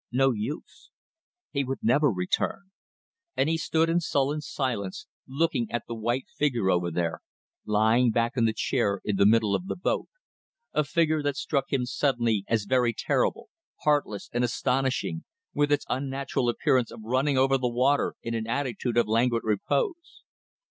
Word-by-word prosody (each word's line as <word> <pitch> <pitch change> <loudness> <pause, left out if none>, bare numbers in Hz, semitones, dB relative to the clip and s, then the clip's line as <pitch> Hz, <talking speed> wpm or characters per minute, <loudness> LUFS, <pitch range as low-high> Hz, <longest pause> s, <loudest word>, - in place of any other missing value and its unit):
No 135 +2 +3
use. 120 +8 -6 0.6
He 140 -2 0
would 135 0 -3
never 140 +6 +4
return. 110 - -2 0.7
And 135 - +2
he 165 - +2
stood 160 +1 +1
in 165 +1 +2
sullen 145 -2 0
silence 125 -10 -3 0.2
looking 135 -4 0
at 120 -2 -2
the 115 - -4
white 120 +3 -1
figure 120 -10 +1
over 90 -1 +1
there, 85 0 -2 0.5
lying 110 +4 +3
back 115 +2 0
in 120 -3 +2
the 110 - +3
chair 105 -5 0
in 105 -2 0
the 100 - +5
middle 110 -2 +3
of 180 - -1
the - - -2
boat; 180 - -1 0.7
a 150 - +2
figure 155 +3 +1
that 145 -1 -1
struck 140 -2 -1
him 130 -3 +1
suddenly 120 -6 +1
as 110 -3 0
very 120 0 +2
terrible, - - 0 0.3
heartless 145 -9 +1
and 120 +1 +1
astonishing, 125 -7 -1 0.3
with 145 0 +1
its 145 - +2
unnatural 135 -1 -1
appearance 125 0 +2
of - - -10
running 130 +5 +1
over 135 +1 +3
the 125 -1 0
water 130 +4 +1
in 115 - -3
an 115 -1 -3
attitude 120 -2 -2
of 120 - +4
languid 115 +1 +2
repose. 340 - -1
125 Hz, 165 wpm, -27 LUFS, 115-140 Hz, 0.7 s, the